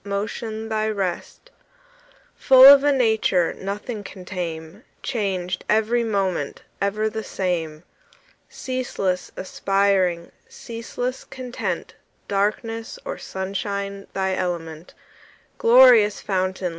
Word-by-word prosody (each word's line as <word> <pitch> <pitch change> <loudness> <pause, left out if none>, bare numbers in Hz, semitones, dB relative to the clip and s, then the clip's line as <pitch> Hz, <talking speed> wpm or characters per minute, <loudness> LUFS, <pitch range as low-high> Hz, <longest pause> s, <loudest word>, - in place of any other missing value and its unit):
Motion 215 +2 -4
thy 220 0 -1
rest; 195 -5 -4 0.8
Full 260 -1 +7
of 280 0 +10
a 290 - +4
nature 220 -9 +2
Nothing 205 +3 -5
can 190 -1 -11
tame, 170 +1 -6 0.2
Changed 190 -7 -2
every 220 +3 +2
moment, 190 -9 -2 0.2
Ever 210 +2 0
the 220 0 -4
same; 170 -6 -3 0.7
Ceaseless 200 -8 -3
aspiring, 190 -3 0 0.2
Ceaseless 240 +2 -5
content, 250 -1 -5 0.3
Darkness 225 +3 -2
or - - -5
sunshine 200 +1 -4
Thy 190 -1 -1
element; 170 -3 -4 0.6
Glorious 235 -3 +6
fountain. 185 -1 -2
200 Hz, 95 wpm, -23 LUFS, 185-225 Hz, 0.8 s, of